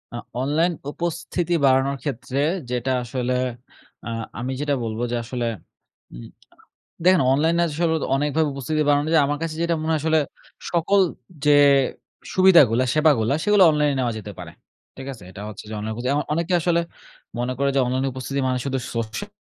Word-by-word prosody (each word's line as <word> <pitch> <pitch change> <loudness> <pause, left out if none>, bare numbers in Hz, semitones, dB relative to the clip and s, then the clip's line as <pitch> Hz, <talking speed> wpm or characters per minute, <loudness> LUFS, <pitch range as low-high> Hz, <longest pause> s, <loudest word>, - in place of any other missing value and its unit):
আ - - -3 0.2
online 155 +6 +1 0.2
উপস্থিতি 175 +1 -3
বাড়ানোর 135 +1 +3
ক্ষেত্রে 130 -1 -3 0.3
যেটা 125 +1 -1
আসলে, 125 +1 -2 0.7
আ - - -4 0.3
আমি 125 +3 -3
যেটা 145 -1 0
বলব 110 0 -4
যে - - 0
আসলে, 120 0 -3 0.7
উম - - -9 0.7
আ - - -7
দেখেন 185 -1 +5
অনলাইনে 165 +5 +2
আসলে 160 +2 0
তো - - -2
অনেকভাবে 150 +2 +1
উপস্থিতি 150 +3 -2
বানানো 145 +1 +2
যায়। 155 -3 +5
আমার 145 +1 -1
কাছে 160 -1 -3
যেটা 170 0 +1
মনে 160 +1 -1
হয় 155 - +1
আসলে 160 +1 +2 0.5
সকল 175 +4 +2 0.5
যে 150 - +5 0.8
সুবিধাগুলা, 165 - +6
সেবাগুলা 145 -7 +3
সেগুলো 210 -2 +5
অনলাইনে 150 -2 +1
নেওয়া 120 -2 0
যেতে 105 -1 -7
পারে, - - -8 0.5
ঠিক 135 - -8
আছে? 110 -7 -14
এটা 100 - -10
হচ্ছে 105 - -9
যে 110 - -6
অনলাইনে 110 +1 -4
খোজে 125 - -3
যেমন 145 +2 +1
অনেকে 170 +3 -1
আসলে 170 0 +2 0.6
মনে 125 +1 -1
করে 140 0 +2
যে 135 - +3
অনলাইনে 130 +2 0
উপস্থিতি 130 +2 -4
মানে 130 - 0
শুধু 135 -1 -1 0.2
সোশ্যাল 115 - -4
140 Hz, 175 wpm, -23 LUFS, 125-160 Hz, 0.8 s, সুবিধাগুলা